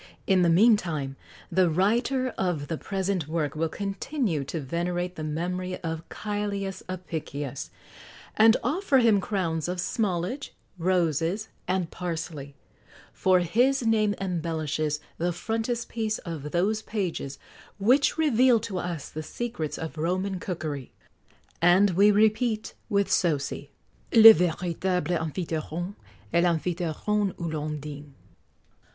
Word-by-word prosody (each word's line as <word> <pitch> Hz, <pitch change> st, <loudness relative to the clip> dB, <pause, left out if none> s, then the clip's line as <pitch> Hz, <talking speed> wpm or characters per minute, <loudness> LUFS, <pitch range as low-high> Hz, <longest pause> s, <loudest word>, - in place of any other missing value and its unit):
In 190 Hz, -2 st, +4 dB
the 175 Hz, -, +4 dB
meantime 165 Hz, -, +3 dB, 0.4 s
the 185 Hz, -2 st, +4 dB
writer 235 Hz, -, +1 dB
of 175 Hz, -, -2 dB
the 165 Hz, -, -2 dB
present 190 Hz, -4 st, -2 dB
work 155 Hz, -3 st, -1 dB
will 160 Hz, +1 st, 0 dB
continue 195 Hz, -, -2 dB
to 160 Hz, +4 st, -4 dB
venerate 175 Hz, +5 st, -2 dB
the 155 Hz, -, -5 dB
memory 180 Hz, +4 st, -3 dB
of 165 Hz, 0 st, -4 dB
Cælius 200 Hz, -2 st, -3 dB
Apicius, 160 Hz, -6 st, -5 dB, 0.7 s
and 225 Hz, +2 st, +6 dB
offer 325 Hz, -3 st, +2 dB
him 225 Hz, -5 st, +4 dB
crowns 170 Hz, -6 st, -1 dB
of 180 Hz, +1 st, -2 dB
smallage, 200 Hz, +7 st, -2 dB, 0.3 s
roses, 175 Hz, +3 st, +1 dB, 0.2 s
and 180 Hz, -2 st, -1 dB
parsley, 160 Hz, -5 st, -5 dB, 0.6 s
for 185 Hz, -1 st, +3 dB
his 245 Hz, +9 st, +2 dB
name 215 Hz, -2 st, +2 dB
embellishes 160 Hz, -4 st, -2 dB, 0.2 s
the 175 Hz, +2 st, +1 dB
frontispiece 225 Hz, +2 st, -2 dB
of 155 Hz, -4 st, -5 dB
those 200 Hz, +7 st, +1 dB
pages 180 Hz, -11 st, -3 dB, 0.4 s
which 250 Hz, +11 st, +3 dB
reveal 255 Hz, -6 st, +4 dB
to 190 Hz, -3 st, -4 dB
us 170 Hz, -5 st, -4 dB
the 155 Hz, -, -6 dB
secrets 165 Hz, -3 st, -4 dB
of 160 Hz, -1 st, -6 dB
Roman 185 Hz, +3 st, -1 dB
cookery; 155 Hz, -8 st, -4 dB, 0.7 s
and 180 Hz, +4 st, +5 dB
we 200 Hz, +4 st, +5 dB
repeat, 215 Hz, +2 st, +2 dB, 0.2 s
with 200 Hz, -2 st, +1 dB
Sosie: 145 Hz, -4 st, 0 dB, 0.4 s
"Le 225 Hz, -1 st, +11 dB
véritable 180 Hz, -1 st, -1 dB
Amphitryon 165 Hz, +2 st, -3 dB, 0.4 s
Est 170 Hz, -, +4 dB
l'Amphitryon 180 Hz, +4 st, 0 dB
où 170 Hz, -2 st, -5 dB
l'on 150 Hz, 0 st, -3 dB
dine." 145 Hz, -1 st, -9 dB
180 Hz, 120 wpm, -27 LUFS, 160-210 Hz, 0.7 s, Le